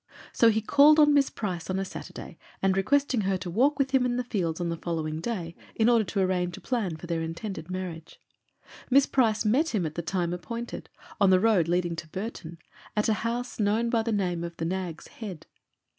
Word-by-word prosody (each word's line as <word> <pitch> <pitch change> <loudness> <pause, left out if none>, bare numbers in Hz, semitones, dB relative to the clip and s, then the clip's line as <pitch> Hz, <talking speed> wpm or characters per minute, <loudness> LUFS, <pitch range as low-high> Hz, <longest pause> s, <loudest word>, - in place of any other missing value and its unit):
So 230 - +5
he 220 0 +1
called 285 +6 +6
on 295 -1 +6
Miss 280 -1 +4
Price 180 -5 -4
on 185 - 0
a 195 - -1
Saturday - - -9 0.2
and 195 -1 +2
requesting 260 +4 +2
her 195 -1 0
to 180 -1 -6
walk 270 - +3
with 275 -2 0
him 265 -2 +3
in 245 -1 0
the 250 - 0
fields 180 -9 -2
on 175 -1 -1
the 170 - -3
following 160 -2 -3
day, 175 -5 -4 0.2
in 225 +1 +3
order 235 -2 +4
to 195 0 -1
arrange 180 -2 0
a - - -9
plan 210 -11 -2
for 160 - -10
their 165 -1 -2
intended 165 +1 -5
marriage. 180 -3 -6 0.7
Miss 275 +1 +6
Price 225 -4 +1
met 265 +6 +2
him 185 -5 +1
at 155 - -4
the 170 - -3
time 175 +1 -1
appointed, 230 +7 -6 0.3
on 200 - +5
the 185 -1 +6
road 200 -6 +3
leading 175 0 0
to 170 - -6
Burton, 185 -4 -6 0.4
at 210 - +2
a - - +4
house 240 +2 -3
known 220 +3 +1
by 230 -2 +2
the 230 +1 -2
name 180 -5 -1
of 170 0 -6
"The 165 - -3
Nag's 180 -2 -4
Head." 195 -8 -8
195 Hz, 220 wpm, -27 LUFS, 170-235 Hz, 0.7 s, called